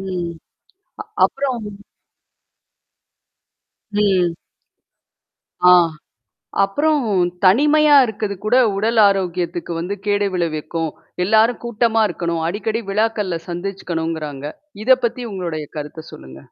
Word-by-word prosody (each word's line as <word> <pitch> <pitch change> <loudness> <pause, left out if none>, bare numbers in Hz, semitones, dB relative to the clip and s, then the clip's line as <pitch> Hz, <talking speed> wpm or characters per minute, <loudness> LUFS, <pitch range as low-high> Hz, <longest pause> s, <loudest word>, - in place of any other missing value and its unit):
உம். 180 -3 -4 0.7
அ - - -7 0.2
அப்புறம் 265 -4 0 2.3
ம். 195 -5 +2 1.4
ஆ. - - +9 0.9
அப்புறம் 295 +10 +1 0.4
தனிமையா 295 +9 +5
இருக்குறது 215 -3 -3
கூட 220 +4 +3 0.2
உடல் 225 +3 0
ஆரோக்கியத்துக்கு 180 -3 -2
வந்து 180 +4 -3
கேடு 205 0 +1
விளைவிக்கும். 165 -1 -2 0.4
எல்லாரும் 220 +4 +3
கூட்டமா 230 -1 +1
இருக்கணும். 170 -2 -3
அடிக்கடி 215 +5 -2
விழாக்கள்ல 210 -4 0
சந்திச்சுக்கணுங்கிறாங்க. 165 -5 -4 0.4
இதைப் 260 +1 +4
பத்தி 240 +1 -5
உங்களோடய 170 -5 -4
கருத்தை 150 +1 -7
சொல்லுங்க. 65 0 -11
195 Hz, 90 wpm, -19 LUFS, 170-225 Hz, 2.3 s, ஆ